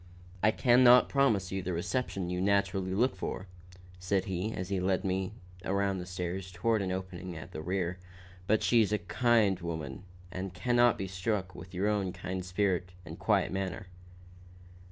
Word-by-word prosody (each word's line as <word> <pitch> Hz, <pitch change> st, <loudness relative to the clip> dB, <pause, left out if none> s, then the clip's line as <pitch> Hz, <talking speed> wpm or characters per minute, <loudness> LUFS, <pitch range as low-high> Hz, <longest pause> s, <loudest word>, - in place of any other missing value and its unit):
"I 110 Hz, -, +5 dB
can 120 Hz, +2 st, +4 dB
not 125 Hz, 0 st, +7 dB
promise 110 Hz, -10 st, +2 dB
you 95 Hz, -, -1 dB
just 95 Hz, -, -7 dB
the 90 Hz, -, -1 dB
reception 95 Hz, +1 st, -2 dB
you 90 Hz, 0 st, -1 dB
naturally 95 Hz, -1 st, +1 dB
look 120 Hz, +2 st, +2 dB
for," 95 Hz, 0 st, -4 dB, 0.5 s
said 90 Hz, +1 st, 0 dB
he, 95 Hz, +3 st, -2 dB
as 90 Hz, -3 st, -5 dB
he 100 Hz, -2 st, 0 dB
led 95 Hz, 0 st, +1 dB
me 95 Hz, 0 st, -1 dB, 0.3 s
around 100 Hz, 0 st, 0 dB
the 90 Hz, -, -6 dB
stairs 90 Hz, +1 st, -4 dB
toward 105 Hz, +5 st, +1 dB
an 95 Hz, -1 st, -2 dB
opening 95 Hz, -1 st, -5 dB
at 80 Hz, -, -9 dB
their 80 Hz, -, -6 dB
rear, 90 Hz, +1 st, -2 dB, 0.5 s
"but 110 Hz, +1 st, +3 dB
she's 115 Hz, -4 st, +4 dB
a 105 Hz, -, +3 dB
kind 105 Hz, +1 st, +2 dB
woman 80 Hz, -6 st, -5 dB, 0.3 s
and 95 Hz, 0 st, -5 dB
can 120 Hz, +7 st, 0 dB
not 120 Hz, -1 st, +6 dB
but -, -, -13 dB
be 95 Hz, -, -3 dB
struck 95 Hz, 0 st, -2 dB
with 90 Hz, -, -10 dB
your 95 Hz, +3 st, +1 dB
own 100 Hz, -4 st, 0 dB
kind 95 Hz, 0 st, -4 dB
spirit 90 Hz, -1 st, 0 dB
and 80 Hz, -1 st, -9 dB
quiet -, -, +2 dB
manner." 95 Hz, 0 st, -3 dB
95 Hz, 185 wpm, -31 LUFS, 90-100 Hz, 0.5 s, not